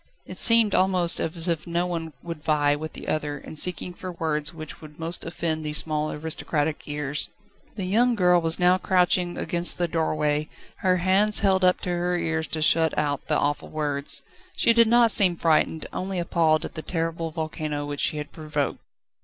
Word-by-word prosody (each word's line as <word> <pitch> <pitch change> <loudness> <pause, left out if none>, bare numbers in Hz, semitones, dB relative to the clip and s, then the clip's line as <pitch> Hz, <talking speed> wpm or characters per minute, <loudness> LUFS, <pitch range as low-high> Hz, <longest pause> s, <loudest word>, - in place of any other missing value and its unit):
It - - -9
seemed 230 -3 +7
almost 185 -2 +3
as 165 +1 -1
if 165 -2 -2
one 170 -2 -3
would 165 -3 -8
vie 145 -2 +2
with 155 +2 -7
the - - -9
other 150 -1 -2
in 145 - -11
seeking 180 +2 0
for 185 +1 -8
words 155 -3 -1
which 155 -2 -10
would 150 -1 -13
most 165 +1 0
offend 165 -1 -3
these 150 0 +3
small 155 -1 -1
aristocratic 155 0 -3
ears. 145 -1 -2 0.5
The 195 -3 -4
young 235 +6 +2
girl 180 -3 +3
was 165 0 +2
now 180 +1 +3
crouching 180 -1 +1
against 175 0 +3
the 175 - 0
doorway, 155 -2 -1 0.3
her 185 -1 +1
hands 195 +4 +3
held 190 -2 +2
up 180 0 +3
to - - -5
her 175 0 -1
ears 160 -1 -2
to 155 -1 -3
shut 160 0 +2
out 145 -2 -2
the - - +1
awful 145 +1 -2
sounds. 145 -2 -2 0.3
She 230 - +3
did 230 0 +4
not 235 0 +4
seem 185 -4 +5
frightened, 160 -1 +1
only 190 0 -4
appalled 165 -2 +1
at - - -8
the 160 - -6
terrible 165 0 -3
volcano 155 -2 -4
which 145 -1 -4
she 155 - +1
had 150 0 -6
provoked. 150 -3 -3
165 Hz, 185 wpm, -24 LUFS, 155-180 Hz, 0.5 s, seemed